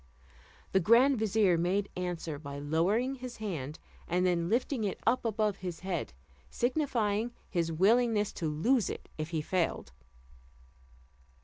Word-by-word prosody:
The 190 Hz, -, +4 dB
grand 235 Hz, +7 st, +5 dB
vizier 205 Hz, -5 st, +3 dB
made 190 Hz, +4 st, +1 dB
answer 175 Hz, -4 st, -3 dB
by 140 Hz, -1 st, -7 dB
lowering 175 Hz, -, +1 dB
his 255 Hz, -2 st, -8 dB
hand, 160 Hz, -9 st, -4 dB, 0.3 s
and 180 Hz, +2 st, +1 dB
then 170 Hz, -1 st, +1 dB
lifting 240 Hz, +1 st, 0 dB
it 200 Hz, -, -2 dB
up 245 Hz, +3 st, +2 dB
above 215 Hz, -2 st, 0 dB
his 180 Hz, -3 st, -6 dB
head, 185 Hz, -, -3 dB, 0.4 s
signifying 240 Hz, -4 st, 0 dB
his 170 Hz, -3 st, -1 dB
willingness 210 Hz, +4 st, +3 dB
to 165 Hz, -, -3 dB
lose 205 Hz, -, +2 dB
it -, -, -7 dB
if 155 Hz, +1 st, -3 dB
he 160 Hz, -2 st, -2 dB
failed. 170 Hz, -, -1 dB
195 Hz, 135 wpm, -31 LUFS, 170-230 Hz, 0.4 s, grand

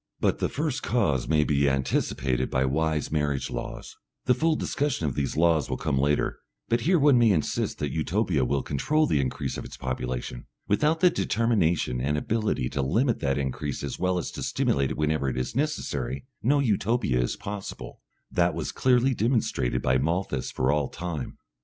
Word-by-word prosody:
But -, -, +1 dB
the -, -, 0 dB
first 145 Hz, -2 st, -2 dB
cause 100 Hz, -, +1 dB
may 75 Hz, -1 st, +3 dB
be 70 Hz, -1 st, +2 dB
anticipated 65 Hz, -1 st, 0 dB
by 65 Hz, +1 st, +1 dB
wise 75 Hz, +2 st, 0 dB
marriage 75 Hz, -3 st, -1 dB
laws.... -, -, -6 dB, 0.3 s
The 125 Hz, -, +5 dB
full 160 Hz, +5 st, +2 dB
discussion 145 Hz, -, -1 dB
of 70 Hz, -, 0 dB
these 70 Hz, +2 st, -2 dB
laws 80 Hz, -2 st, +3 dB
will -, -, -1 dB
come 65 Hz, -, -1 dB
later, 75 Hz, +2 st, +1 dB, 0.3 s
but 115 Hz, +1 st, +2 dB
here 175 Hz, +8 st, +3 dB
one 140 Hz, -4 st, +5 dB
may 115 Hz, -1 st, +5 dB
insist 80 Hz, -7 st, 0 dB
that 75 Hz, -2 st, -2 dB
Utopia 80 Hz, -, 0 dB
will 70 Hz, +2 st, 0 dB
control 155 Hz, -, +1 dB
the 75 Hz, -, +1 dB
increase 65 Hz, -, -3 dB
of -, -, -6 dB
its -, -, -9 dB
population. 60 Hz, -1 st, -4 dB, 0.2 s
Without 150 Hz, +10 st, +2 dB
the 180 Hz, -1 st, +6 dB
determination 85 Hz, -, +1 dB
and 75 Hz, +3 st, 0 dB
ability 105 Hz, -, 0 dB
to 70 Hz, 0 st, -2 dB
limit 115 Hz, -, +1 dB
that 70 Hz, -1 st, 0 dB
increase 70 Hz, +1 st, -3 dB
as -, -, -4 dB
well 90 Hz, 0 st, +1 dB
as 85 Hz, -, -3 dB
to -, -, -7 dB
stimulate 70 Hz, -1 st, +1 dB
it -, -, -4 dB
whenever 75 Hz, -2 st, +1 dB
it 65 Hz, -, -4 dB
is 65 Hz, -, -3 dB
necessary, 70 Hz, -, -2 dB, 0.2 s
no 140 Hz, +6 st, +3 dB
Utopia 110 Hz, -, +1 dB
is -, -, -1 dB
possible. 100 Hz, -1 st, -7 dB, 0.3 s
That -, -, +2 dB
was -, -, -3 dB
clearly 130 Hz, +1 st, +3 dB
demonstrated 110 Hz, -, 0 dB
by 65 Hz, 0 st, +3 dB
Malthus 80 Hz, -2 st, -1 dB
for 65 Hz, +2 st, +1 dB
all 75 Hz, -2 st, 0 dB
time. 85 Hz, -7 st, -5 dB
80 Hz, 185 wpm, -26 LUFS, -, 0.3 s, the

